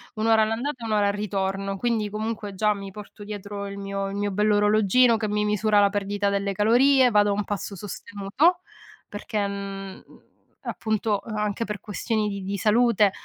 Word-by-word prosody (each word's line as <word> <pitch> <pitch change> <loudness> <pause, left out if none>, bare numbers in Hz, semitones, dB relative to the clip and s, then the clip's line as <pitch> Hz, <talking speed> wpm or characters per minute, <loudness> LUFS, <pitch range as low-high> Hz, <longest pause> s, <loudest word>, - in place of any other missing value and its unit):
1 215 0 -2
ora 225 -1 +5
all'andata, 235 +4 -2
e - - -4
1 - - -3
ora 205 -1 +3
al 200 - +1
ritorno. 195 -1 -2
Quindi, 220 -1 0
comunque, 215 -1 -4
già 210 +2 +2
mi 195 -1 -7
porto 205 +1 -11
dietro 205 -1 -6
il 200 0 -7
mio 195 0 -3
il 195 - -6
mio 205 0 -1
bell'orologino 210 +3 +3
che 220 -1 -2
mi 210 0 0
misura 210 0 +2
la 200 0 +5
perdita 205 0 -1
delle 200 0 -1
calorie, 250 +5 +4
vado 205 0 +4
a - - +2
un 205 +1 -1
passo 205 0 -4
sostenuto, 205 - -1 0.5
perché 205 0 -3
mhmm, 195 -1 -6 0.6
appunto, 215 -1 -1
uhm, 220 -2 -5
anche 210 +1 -1
per 210 -2 -5
questioni 215 +1 -2
di 200 -1 -5
di 195 +2 -3
salute, 215 -1 +3
205 Hz, 185 wpm, -25 LUFS, 200-220 Hz, 0.6 s, ora